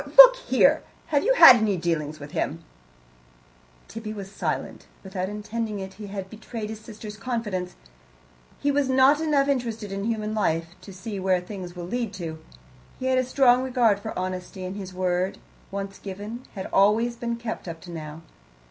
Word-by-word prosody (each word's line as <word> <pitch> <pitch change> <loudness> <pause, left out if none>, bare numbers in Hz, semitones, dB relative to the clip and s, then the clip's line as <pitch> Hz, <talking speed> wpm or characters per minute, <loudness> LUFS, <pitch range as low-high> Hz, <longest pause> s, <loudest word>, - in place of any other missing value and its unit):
Or - - -12
look - - +12
here - - +3 0.3
have 285 - +4
you - - +3
had 260 - +11
any 210 -4 +1
dealings 155 -3 -2
with 145 0 -9
him?" 165 -1 -2 1.2
Tibby 220 -1 -6
was 195 -2 -8
silent. - - -4 0.2
Without 190 -1 -3
intending 210 0 -4
it, 190 0 -7
he 205 +1 -9
had 195 -1 -5
betrayed 220 +1 -7
his 220 - -7
sister's 215 -1 -9
confidence; 210 -5 -3 0.8
he 285 - +1
was 280 -1 +1
not 265 +3 +5
enough 290 -3 +2
interested 230 -6 -2
in 195 +1 -3
human 215 -2 -1
life 165 -5 0
to 200 - -11
see 195 +2 -6
where 185 -1 +2
things 180 -1 -8
will 175 -1 -6
lead 230 +2 -3
to. 160 -3 -6 0.6
He 260 - -4
had 260 0 +3
a - - +2
strong 255 -1 +4
regard 245 -6 +2
for 220 +2 -6
honesty, 185 +1 -4
and 185 +1 -5
his 195 -2 -6
word, 185 0 -1 0.3
once 195 0 -5
given, 205 +5 -7
had 190 - -5
always 220 +4 +4
been 235 -1 -3
kept 230 -4 -6
up 165 -1 -6
to 175 - -10
now. 155 -1 -7
210 Hz, 180 wpm, -25 LUFS, 185-235 Hz, 1.2 s, look